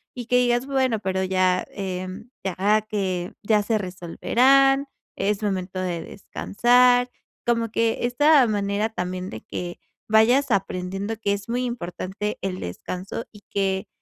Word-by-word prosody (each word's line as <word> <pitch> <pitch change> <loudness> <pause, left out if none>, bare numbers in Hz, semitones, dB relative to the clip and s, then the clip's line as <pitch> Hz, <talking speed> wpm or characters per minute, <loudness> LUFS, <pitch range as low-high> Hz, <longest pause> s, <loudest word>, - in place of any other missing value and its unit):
y 245 -1 -5
que 250 +1 +2
digas 245 0 +2
bueno, 265 -4 +1
pero 190 -1 -1
ya, 185 -1 +2
eh, 185 -2 -4 0.4
ya 200 +3 +2
que 185 -4 -2
ya 210 0 +3
se 220 +2 0
resolverán, 260 +9 +3 0.3
es 205 +2 -1
momento 185 -2 -2
de 175 -2 -2
descansar. 245 +7 +2 0.3
Como 230 -1 +1
que 230 +1 +1
esta 285 +1 +5
manera 205 +1 0
también 180 -2 -4
de 110 - -8
que 175 -1 -6 0.3
vayas 245 +6 +4
aprendiendo 195 +1 -2
que 200 -2 0
es 205 +2 -6
muy 250 +1 0
importante 210 -2 -4
el 185 -1 -3
descanso 185 - -5
y 210 - -15
que 190 -1 0
205 Hz, 140 wpm, -24 LUFS, 185-240 Hz, 0.4 s, esta